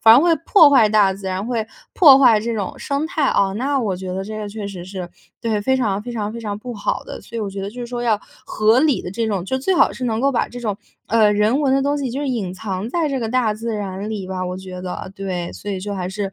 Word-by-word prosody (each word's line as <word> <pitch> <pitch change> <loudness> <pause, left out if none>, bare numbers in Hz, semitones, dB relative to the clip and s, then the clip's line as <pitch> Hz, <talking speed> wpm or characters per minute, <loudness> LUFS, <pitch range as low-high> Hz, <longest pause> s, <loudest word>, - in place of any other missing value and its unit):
反 225 0 +8
而 255 - +7
会 345 - +3
破 315 -8 +7
坏 240 -6 +6
大 205 -2 +4
自 195 0 -8
然， 190 +2 -2
会 230 -3 -1 0.3
破 290 -7 +8
坏 245 -5 +6
这 230 +2 -2
种 200 -4 -4
生 280 +2 -2
态。 320 -6 0
啊， 195 -6 +2
那 270 +5 0
我 200 -6 -1
觉 185 0 -5
得 190 +1 -3
这 215 +2 -6
个 210 -1 -5
确 205 -1 -6
实 180 -3 -8
是 185 -2 -6 0.3
对， 220 -3 0
非 265 +5 +2
常 210 -6 0
非 240 +3 -7
常 215 -2 -3
非 235 - -6
常 210 -3 -4
不 245 +4 -7
好 205 - -2
的。 - - -8
所 235 - -10
以 - - -2
我 205 -2 -3
觉 195 0 -6
得 195 - -4
就 245 - -9
是 240 - -4
说 240 0 -4
要 220 -4 +1 0.2
合 220 +3 +3
理 290 -1 +2
地 180 - -6
这 225 +3 -2
种 195 -5 -1
就 260 +6 -1
最 375 +8 +1
好 - - +4
是 255 - -5
能 225 -1 0
够 275 - +3
把 250 - 0
这 245 - -8
种， 210 -4 -2 0.3
呃， 215 -2 +4
人 215 +7 +2
文 270 -2 +2
的 270 - +2
东 285 +1 0
西 270 -2 -2
就 270 +4 -3
是 290 - -2
隐 205 -8 -2
藏 190 +1 -4
在 320 +3 0
这 275 - -1
个 230 -3 -2
大 240 -2 +1
自 225 +1 -4
然 200 0 -4
里 200 -4 -5
吧， 185 -1 -3
我 180 - -4
觉 185 -1 -8
得。 185 0 -6
对， 185 -3 -3
所 205 - -9
以 190 - -3
就 205 +2 -4
还 180 -1 -3
是 195 0 -4
215 Hz, 310 characters per minute, -20 LUFS, 195-250 Hz, 0.3 s, 反